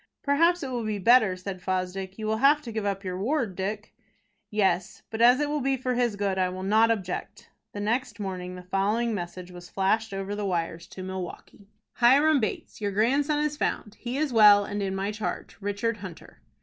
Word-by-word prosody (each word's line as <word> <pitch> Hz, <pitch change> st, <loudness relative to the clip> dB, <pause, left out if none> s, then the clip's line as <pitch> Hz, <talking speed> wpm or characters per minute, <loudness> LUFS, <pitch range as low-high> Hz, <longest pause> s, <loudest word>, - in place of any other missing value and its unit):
"Perhaps 335 Hz, +5 st, +3 dB
it 265 Hz, -, -4 dB
will 240 Hz, -2 st, -2 dB
be 215 Hz, -1 st, -2 dB
better," 215 Hz, -1 st, +5 dB
said 185 Hz, 0 st, -7 dB
Fosdick. 185 Hz, +1 st, -3 dB
"You 220 Hz, -, -5 dB
will 220 Hz, 0 st, 0 dB
have 280 Hz, +5 st, +5 dB
to 235 Hz, -, -6 dB
give 220 Hz, -2 st, -3 dB
up 195 Hz, 0 st, -2 dB
your 185 Hz, -1 st, -4 dB
ward, 235 Hz, -3 st, -1 dB
Dick." 205 Hz, +3 st, -4 dB, 0.6 s
"Yes; 190 Hz, -4 st, 0 dB
but 225 Hz, 0 st, -3 dB
as 245 Hz, +3 st, +7 dB
it 295 Hz, -, +1 dB
will 295 Hz, 0 st, -1 dB
be 270 Hz, 0 st, +1 dB
for 255 Hz, 0 st, -2 dB
his 240 Hz, -3 st, +1 dB
good, 200 Hz, -2 st, -1 dB
I 185 Hz, -1 st, +2 dB
will 185 Hz, +1 st, -6 dB
not 220 Hz, +4 st, +4 dB
object." 190 Hz, -5 st, -3 dB, 0.2 s
The 205 Hz, -, -5 dB
next 230 Hz, +1 st, -1 dB
morning 180 Hz, -2 st, -5 dB
the 180 Hz, -, -9 dB
following 205 Hz, +5 st, 0 dB
message 180 Hz, -1 st, -6 dB
was 175 Hz, 0 st, -11 dB
flashed 215 Hz, +3 st, 0 dB
over 195 Hz, +1 st, -4 dB
the 205 Hz, 0 st, -3 dB
wires 170 Hz, -3 st, -2 dB
to 185 Hz, -, -9 dB
Milwaukie: 190 Hz, +2 st, -7 dB, 0.3 s
"HIRAM 280 Hz, +5 st, +5 dB
BATES. 215 Hz, -1 st, -4 dB
"Your 205 Hz, -1 st, -1 dB
grandson 280 Hz, +8 st, +2 dB
is 300 Hz, 0 st, -2 dB
found. 210 Hz, -7 st, -2 dB
He 250 Hz, +2 st, -4 dB
is 295 Hz, -3 st, -1 dB
well, 205 Hz, -2 st, +7 dB
and 205 Hz, 0 st, -4 dB
in 195 Hz, -1 st, -2 dB
my 195 Hz, +2 st, -2 dB
charge. 215 Hz, 0 st, -5 dB
"RICHARD 205 Hz, +3 st, -1 dB
HUNTER." 185 Hz, -5 st, -11 dB
205 Hz, 205 wpm, -27 LUFS, 190-240 Hz, 0.6 s, as